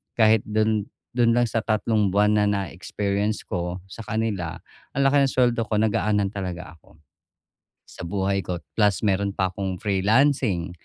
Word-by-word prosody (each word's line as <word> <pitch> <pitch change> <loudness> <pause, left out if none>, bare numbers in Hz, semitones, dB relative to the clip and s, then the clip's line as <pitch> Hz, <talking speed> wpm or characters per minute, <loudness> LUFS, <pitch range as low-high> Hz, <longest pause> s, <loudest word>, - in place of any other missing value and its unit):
kahit 110 -1 +5
dun 110 -1 +1 0.3
dun 120 -2 +4
lang 120 +1 +3
sa 115 -1 -2
tatlong 110 -2 +1
buwan 105 +2 +3
na 105 - +3
na-experience 100 +2 -2
ko 90 0 -3
sa 115 - -8
kanila, 105 -7 -2 0.4
ang 140 - +1
laki 140 0 +4
ng 135 - -1
suweldo 120 -2 +2
ko, 110 -1 -1
nagaanan 105 -1 +1
talaga 90 -4 -6
ako, 80 -1 -23 0.9
sa - - -9
buhay 95 +2 0
ko 90 - -3 0.2
plus 105 -3 +3
meron 100 -1 0
pa 95 -1 0
akong 95 0 -3
freelancing, 105 - +2
105 Hz, 155 wpm, -24 LUFS, 95-110 Hz, 0.9 s, kahit